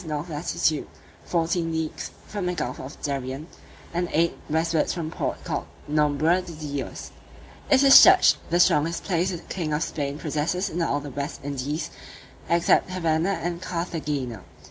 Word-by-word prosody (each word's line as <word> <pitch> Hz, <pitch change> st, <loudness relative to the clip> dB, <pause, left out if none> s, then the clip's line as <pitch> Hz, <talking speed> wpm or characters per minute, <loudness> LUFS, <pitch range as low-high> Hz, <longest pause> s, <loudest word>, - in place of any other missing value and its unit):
north 155 Hz, +1 st, -4 dB
latitude, 155 Hz, -1 st, 0 dB, 0.4 s
fourteen 165 Hz, 0 st, 0 dB
leagues 160 Hz, -1 st, -3 dB, 0.2 s
from 200 Hz, -4 st, -4 dB
the 180 Hz, -, -1 dB
gulf 125 Hz, -6 st, -3 dB
of 135 Hz, +3 st, -9 dB
Darien, 135 Hz, 0 st, -3 dB, 0.5 s
and 175 Hz, 0 st, -1 dB
eight 170 Hz, +1 st, +2 dB
westwards 160 Hz, 0 st, +1 dB
from 165 Hz, -2 st, -4 dB
the -, -, -12 dB
port -, -, -3 dB
called -, -, -3 dB, 0.2 s
Nombre 150 Hz, +4 st, +2 dB
de 180 Hz, -2 st, -9 dB
Dios. 145 Hz, -3 st, -5 dB, 0.6 s
It 275 Hz, 0 st, +5 dB
is 275 Hz, -1 st, +10 dB
judged 370 Hz, 0 st, +7 dB
the 175 Hz, -, +2 dB
strongest 165 Hz, -1 st, +3 dB
place 180 Hz, -1 st, 0 dB
the 180 Hz, -, -3 dB
king 165 Hz, -1 st, -4 dB
of 150 Hz, -, +1 dB
Spain 140 Hz, -1 st, -3 dB
possesses 160 Hz, +6 st, -1 dB
in 170 Hz, -, -2 dB
all 145 Hz, -3 st, 0 dB
the 145 Hz, -1 st, -7 dB
West 140 Hz, +2 st, -5 dB
Indies, 145 Hz, +3 st, -3 dB, 0.6 s
except 170 Hz, +1 st, +3 dB
Havanna 170 Hz, 0 st, 0 dB
and 175 Hz, 0 st, -3 dB
Carthagena. 150 Hz, -, -3 dB
160 Hz, 160 wpm, -25 LUFS, 145-175 Hz, 0.6 s, is